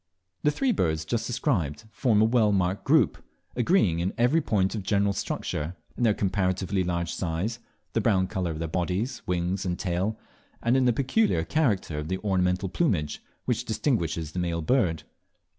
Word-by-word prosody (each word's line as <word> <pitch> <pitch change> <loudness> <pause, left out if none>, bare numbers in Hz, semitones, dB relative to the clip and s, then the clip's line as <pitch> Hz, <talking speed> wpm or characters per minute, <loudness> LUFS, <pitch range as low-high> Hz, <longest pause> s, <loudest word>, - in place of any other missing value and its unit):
The 150 - +3
three 260 - +1
birds 80 - 0
just 115 +5 -1
described 90 - -1
form 110 -4 +3
a - - +6
well 110 -2 +3
marked 95 -1 0
group, - - +3 0.3
agreeing 115 - +3
in 90 +3 -1
every 125 +8 +3
point 95 -8 +1
of 110 - -3
general 100 +1 +1
structure, 90 -4 -3 0.2
in - - -6
their 110 -3 +4
comparatively 95 -1 0
large 85 -1 -2
size, 95 +7 -2 0.3
the 115 - +1
brown 95 -4 +3
colour 95 -1 -2
of 80 - -4
their 80 +1 -3
bodies, 90 - -2
wings, 90 +2 -1
and 90 -2 -2
tail, 95 +4 -1 0.4
and 120 +2 +2
in 130 -1 +3
the 125 - +5
peculiar 135 - +1
character 100 - 0
of 75 - -5
the 95 +2 -1
ornamental 95 -1 +1
plumage 90 - 0 0.2
which - - 0
distinguishes 105 - -1
the 90 - -4
male 85 -2 -1
bird. 90 -7 +1
95 Hz, 175 wpm, -27 LUFS, 85-115 Hz, 0.4 s, a